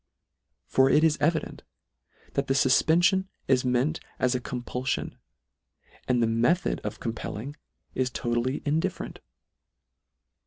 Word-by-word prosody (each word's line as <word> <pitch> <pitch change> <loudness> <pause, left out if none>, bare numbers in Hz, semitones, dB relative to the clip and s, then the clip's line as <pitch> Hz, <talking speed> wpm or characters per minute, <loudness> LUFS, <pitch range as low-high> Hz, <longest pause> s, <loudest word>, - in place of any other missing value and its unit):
For 130 0 +3
it 150 +3 +4
is 160 -2 +3
evi 160 +1 +2
dent, - - -10 0.7
that 140 0 -1
the 135 - +1
fufpenfion 175 +8 +4 0.2
is 130 -1 +3
meant 130 +6 +1 0.2
as 125 0 +1
a 125 - 0
com 125 0 -5
pullion; 125 +2 -2 0.9
and 125 -2 +2
the - - +3
method 120 +11 +1
of - - -5
compelling 115 +3 -5 0.4
is 130 -1 0
to 120 0 -3
tally 125 +3 -1
indifferent. 155 +2 -2
130 Hz, 130 wpm, -27 LUFS, 125-155 Hz, 0.9 s, it